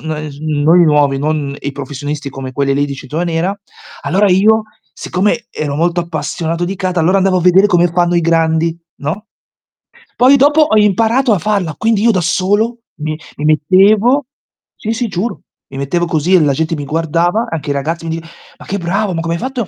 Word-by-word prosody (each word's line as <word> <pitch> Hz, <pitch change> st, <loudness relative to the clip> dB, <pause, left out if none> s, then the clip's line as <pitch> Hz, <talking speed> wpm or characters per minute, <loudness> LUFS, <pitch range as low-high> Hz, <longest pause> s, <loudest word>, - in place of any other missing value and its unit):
no, 155 Hz, -1 st, -4 dB, 0.5 s
i 175 Hz, -, +6 dB
nuovi, 145 Hz, -3 st, +2 dB
non 145 Hz, -1 st, -2 dB
i 140 Hz, -, -4 dB
professionisti 145 Hz, +1 st, -5 dB
come 130 Hz, -1 st, -7 dB
quelli 140 Hz, +1 st, 0 dB
lì 145 Hz, +1 st, +1 dB
di 140 Hz, -, -5 dB
cintura 150 Hz, +6 st, -4 dB
nera, 170 Hz, +3 st, -1 dB, 0.5 s
allora 190 Hz, +7 st, +2 dB
io, 215 Hz, +4 st, +4 dB, 0.3 s
siccome 210 Hz, +6 st, -1 dB
ero 145 Hz, -2 st, -4 dB
molto 175 Hz, +2 st, +1 dB
appassionato 165 Hz, +1 st, -3 dB
di 190 Hz, +3 st, -3 dB
kata, 185 Hz, -2 st, -1 dB
andavo 185 Hz, +3 st, +2 dB
a -, -, +1 dB
vedere 185 Hz, +3 st, +5 dB
come 175 Hz, -3 st, +3 dB
fanno 175 Hz, +1 st, +1 dB
i 170 Hz, -, +2 dB
grandi, 165 Hz, 0 st, +1 dB, 0.3 s
no, 190 Hz, +10 st, -4 dB, 0.9 s
poi 260 Hz, +3 st, +6 dB
dopo 290 Hz, +3 st, +4 dB
ho 215 Hz, -7 st, +2 dB
imparato 225 Hz, +5 st, +2 dB
a 205 Hz, -, +2 dB
farla, 185 Hz, -4 st, -1 dB
quindi 220 Hz, -2 st, +1 dB
io 230 Hz, -, +4 dB
da 185 Hz, -, 0 dB
solo 205 Hz, +7 st, 0 dB, 0.2 s
mi 155 Hz, 0 st, -4 dB, 0.2 s
mi 150 Hz, -, -3 dB
mettevo, 200 Hz, -, +3 dB, 0.5 s
sì, 220 Hz, -, -4 dB
sì, 240 Hz, +1 st, -2 dB
giuro, 200 Hz, +2 st, -4 dB, 0.3 s
mi 135 Hz, -, -7 dB
mettevo 155 Hz, +6 st, -1 dB
così 165 Hz, +2 st, +1 dB
e 180 Hz, -, +5 dB
la 145 Hz, -2 st, +2 dB
gente 160 Hz, +3 st, -1 dB
mi 145 Hz, -2 st, -5 dB
guardava, 165 Hz, -, 0 dB
anche 160 Hz, -3 st, -5 dB
i -, -, +1 dB
ragazzi 160 Hz, +4 st, -3 dB
mi 165 Hz, -, -3 dB
di 165 Hz, -, -9 dB, 0.3 s
"Ma -, -, -13 dB
che 200 Hz, -, -3 dB
bravo, 190 Hz, +2 st, -1 dB
ma 165 Hz, -, -2 dB
come 165 Hz, 0 st, -2 dB
hai -, -, -5 dB
fatto 255 Hz, -4 st, -3 dB
175 Hz, 195 wpm, -15 LUFS, 155-200 Hz, 0.9 s, i